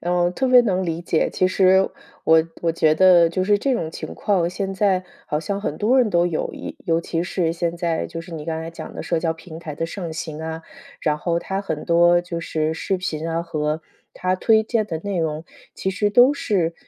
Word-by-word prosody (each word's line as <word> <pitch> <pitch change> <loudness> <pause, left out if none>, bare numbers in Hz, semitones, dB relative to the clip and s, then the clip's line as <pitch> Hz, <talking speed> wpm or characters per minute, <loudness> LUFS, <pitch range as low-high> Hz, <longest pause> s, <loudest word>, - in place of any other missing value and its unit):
呃， 175 0 +1
我 175 - +2
特 260 +8 -1
别 250 -1 +8
能 190 -4 0
理 165 -1 -2
解， 170 -2 0
其 185 - +2
实 190 0 +4 0.4
我 160 0 +6 0.2
我 165 - +1
觉 155 -1 +3
得 175 -1 +6
就 185 +2 -1
是 205 +1 +4
这 275 +5 0
种 160 -8 -2
情 - - -7
况， 185 -5 +1
现 195 +1 -3
在 190 -2 +1 0.2
好 150 - -1
像 195 +6 -3
很 - - -3
多 235 +5 +3
人 235 -4 +3
都 175 -1 +3
有 165 -3 -2
一 - - -7
尤 165 0 +1
其 170 0 -2
是 175 -2 -1
现 170 0 -2
在 170 -2 -1
就 165 0 -6
是 165 +1 -11
你 150 - -6
刚 160 0 -3
才 165 +1 -6
讲 165 - -9
的 - - -5
社 170 - 0
交 165 0 0
平 160 0 -11
台 155 -3 -7
的 165 - -2
盛 170 -2 -6
行 155 -1 -5
啊， 160 0 -5 0.4
然 150 -1 +1
后 170 +1 0
它 190 +3 -3
很 160 -6 -4
多 175 +1 +4
就 170 -1 -5
是 160 -1 -1
视 190 +3 -1
频 165 -3 -3
啊 165 +1 -1
和 155 -1 -2 0.3
它 185 0 -1
推 220 +3 +3
荐 220 -1 0
的 160 -4 -3
内 195 +1 -3
容， 160 -1 -2 0.3
其 - - -3
实 205 +2 0
都 245 +6 +6
是， 180 -11 0
170 Hz, 250 characters per minute, -22 LUFS, 160-190 Hz, 0.4 s, 别